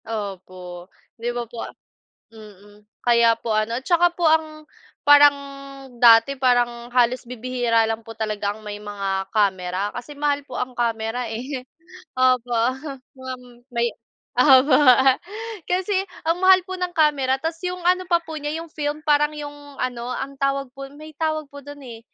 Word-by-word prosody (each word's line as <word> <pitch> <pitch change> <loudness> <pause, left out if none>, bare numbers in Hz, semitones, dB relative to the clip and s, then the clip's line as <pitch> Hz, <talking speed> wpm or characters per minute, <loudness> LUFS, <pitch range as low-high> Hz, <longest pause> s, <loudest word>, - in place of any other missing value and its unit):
Opo. 185 -4 -7 0.3
'Di 240 - -1
ba 240 0 -3
po 230 0 -8
a - - -6 0.6
mm, 205 -1 -16 0.2
kaya 235 -1 +4
po 230 -1 -3
ano, 215 +2 0
'tsaka 345 +4 +3
po 345 - 0
ang, 310 -1 0 0.4
parang 290 0 +7 0.6
dati, 230 +2 +7
parang 240 -2 +1
halos 250 0 +3
bibihira 245 -1 0
lang 225 0 -3
po 225 - -9
talaga 210 -2 -2
ang 215 0 -15
may 205 0 -6
mga 195 -2 -3
kamera 190 -2 0
kasi 245 +4 -8
mahal 290 0 0
po 260 - -8
ang 250 0 -3
kamera, 230 0 -2
eh. 250 +3 -5 0.5
Opo, 255 -1 +2
um, 260 +5 -1 0.2
wam 260 -1 -7 0.3
may 235 0 +1 0.5
opo, 260 +1 +6 0.9
kasi 370 +3 0 0.3
ang 335 +2 +1
mahal 375 0 +7
po 375 - -4
ng 360 -1 -3
kamera 285 -4 +3
tapos 325 +2 -4
'yong 360 0 -3
ano 365 +1 +2
pa 340 -1 +3
po 320 -1 -7
niya 295 0 -4
'yong 335 - -9
film 295 0 -3
parang 295 0 +3
'yong 290 -1 -9
ano, 245 -1 -3
ang 275 +1 -5
tawag 275 -1 0
po 275 0 -7
no'n, 290 - -15
may 310 0 -10
tawag 310 -2 -2
po 285 0 -11
do'n, 290 0 -10
eh, 225 -1 -9
255 Hz, 165 wpm, -22 LUFS, 225-290 Hz, 0.9 s, parang